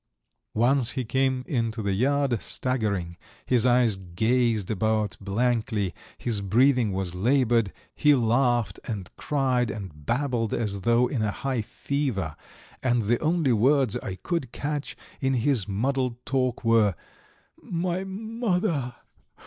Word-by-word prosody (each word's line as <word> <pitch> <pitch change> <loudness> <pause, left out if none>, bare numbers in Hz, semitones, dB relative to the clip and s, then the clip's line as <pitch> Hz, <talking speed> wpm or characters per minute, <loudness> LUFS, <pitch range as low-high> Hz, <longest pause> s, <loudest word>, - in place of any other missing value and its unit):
Once 125 +2 +2
he 130 -2 -2
came 130 +2 +1
into 115 -4 -1
the 100 -1 0
yard, 135 +1 +1
staggering; 100 -9 -1 0.3
his 125 -1 +3
eyes 120 -4 +4
gazed 110 +4 0
about 110 0 0
blankly, 110 -2 0 0.2
his 115 -4 -1
breathing 120 +2 +3
was 95 -2 -3
laboured; 115 +1 +2 0.2
he 150 -1 +4
laughed 120 -1 +1
and 100 -5 -6
cried 130 -5 0
and 95 -9 -8
babbled 120 -3 0
as 100 -4 -2
though 120 +4 +3
in 125 -1 -2
a 105 - +1
high 130 +2 -2
fever, 110 - -2 0.5
and 120 -3 +2
the 115 +3 +1
only 160 -5 +2
words 130 +1 +3
I 95 -6 -5
could 150 - -3
catch 145 +1 -4 0.2
in 135 -1 +1
his 120 -4 +1
muddled 125 +4 0
talk 130 -2 0
were, 115 -4 +4 0.7
"My 180 +2 -2
mother! 190 - -2
120 Hz, 130 wpm, -26 LUFS, 105-135 Hz, 0.7 s, eyes